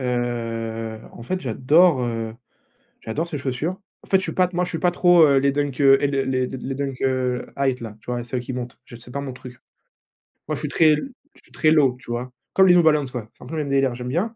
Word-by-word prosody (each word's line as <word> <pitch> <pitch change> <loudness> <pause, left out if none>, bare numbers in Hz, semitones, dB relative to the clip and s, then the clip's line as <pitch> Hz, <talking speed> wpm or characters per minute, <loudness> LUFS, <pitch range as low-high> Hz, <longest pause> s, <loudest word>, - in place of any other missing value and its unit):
Heu, 115 -3 -3
en - - -12
fait 185 +7 -2
j'adore, 145 +4 +3
heu, 115 -2 -3 0.7
j'adore 150 +10 -3
ces 155 - -4
chaussures. 140 +6 -2 0.3
En - - -17
fait, 190 - +5
je 190 - -3
suis - - -3
pas 185 -1 +2
moi 180 - +1
je 180 - -3
suis 165 - -3
pas 180 - +2
trop, 175 -1 +5
heu, 140 -2 +4
les 140 +1 +2
Dunk, 145 -1 -2
heu, 135 0 +7
les 145 - +1 0.2
les 130 -1 0
les 130 +1 -5
Dunk, 135 -2 -4
heu, 130 -1 0
High 135 -2 +1
t 120 - -10
là, 110 -2 -8
tu - - -12
vois? 120 -1 -2
Celles 125 +1 -3
qui 125 +1 -6
montent. 125 -2 -6
Je 120 - -12
c'est 120 +1 -13
pas 140 - -3
mon 135 -2 -5
truc. 125 0 -11 0.9
Moi - - -1
je - - -7
suis - - -3
très 155 -2 +4
je 270 - -10
suis - - -24
très 155 - +2
Low, 140 -5 +4
tu 120 - -10
vois? 125 +2 -4 0.2
Comme 190 0 +5
les 180 - +7
New 175 - +6
Balance 150 -5 +2
ouais, 125 -3 -4
c'est - - -17
un - - -11
peu 160 - -6
le 155 - 0
même 140 - -6
délire, 135 -1 +3
ouais, 120 - -6
j'aime 125 0 -6
bien 200 - -1
130 Hz, 270 wpm, -22 LUFS, 125-155 Hz, 0.9 s, heu